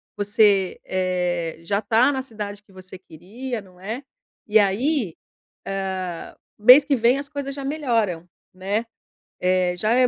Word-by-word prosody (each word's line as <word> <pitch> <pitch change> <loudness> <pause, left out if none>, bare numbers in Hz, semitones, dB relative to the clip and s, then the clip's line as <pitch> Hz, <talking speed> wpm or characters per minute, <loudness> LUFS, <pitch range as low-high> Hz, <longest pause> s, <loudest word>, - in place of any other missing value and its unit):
você, 205 -2 +2
eh, 180 -3 -1
já 200 +5 -1
tá 230 +6 +3
na 265 - -2
cidade 210 -4 -7
que 205 - -24
você 185 0 -11
queria, 210 +8 -7
não 185 -2 -19
é? 220 +7 -5 0.5
E 215 - +4
aí, 215 - +1 0.9
ah, 175 -2 -7 0.2
mês 250 +7 +8
que 280 - +2
vem, 245 +2 +3
as 280 - -6
coisas 280 -1 -5
já 275 0 -6
melhoram, 230 - -1 0.3
né. 200 +5 -2 0.6
Eh, 180 -1 +2
já 215 +5 0
é 250 +1 +4
205 Hz, 150 wpm, -23 LUFS, 185-250 Hz, 0.9 s, mês